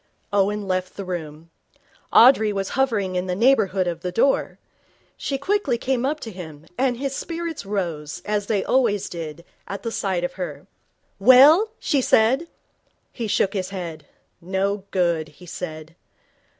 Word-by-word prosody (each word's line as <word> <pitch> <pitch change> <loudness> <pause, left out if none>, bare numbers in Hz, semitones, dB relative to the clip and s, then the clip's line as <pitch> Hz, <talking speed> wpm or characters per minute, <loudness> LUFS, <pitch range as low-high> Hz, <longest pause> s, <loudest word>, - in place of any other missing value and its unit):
Owen 205 0 +1
left 185 0 -2
the 200 - -5
room. 165 -2 -6 0.6
Audrey 225 -3 +6
was 195 -1 -2
hovering 220 -8 0
in 180 +1 -1
the 180 - -1
neighbourhood 200 -5 +3
of 170 -2 -3
the 180 - -3
door. 255 +8 +1 0.6
She 275 - -3
came 275 - -15
quickly 385 - +1 0.2
up 300 +3 -1
to 225 - -6
him, 160 -5 -10
and 255 0 +1
his 275 +1 -3
spirits 330 - -5
rose, 170 -6 -3
as 205 -1 -1
they 205 -4 +1
always 230 -7 +1
did, 165 -1 -7 0.2
at 200 - -6
the 230 - -3
sight 190 -5 -1
of 175 - -2
her. 150 -3 -5 0.5
'Well?' 280 - +7
she 280 - +1
said. 255 +7 +3 0.7
He 230 -3 -4
shook 195 -1 +1
his 190 -3 -2
head. 175 -5 -7 0.3
'No 190 +2 -1
good,' 170 -4 0
he 165 +4 -16
said. 160 -2 -7
195 Hz, 155 wpm, -23 LUFS, 175-245 Hz, 0.7 s, Well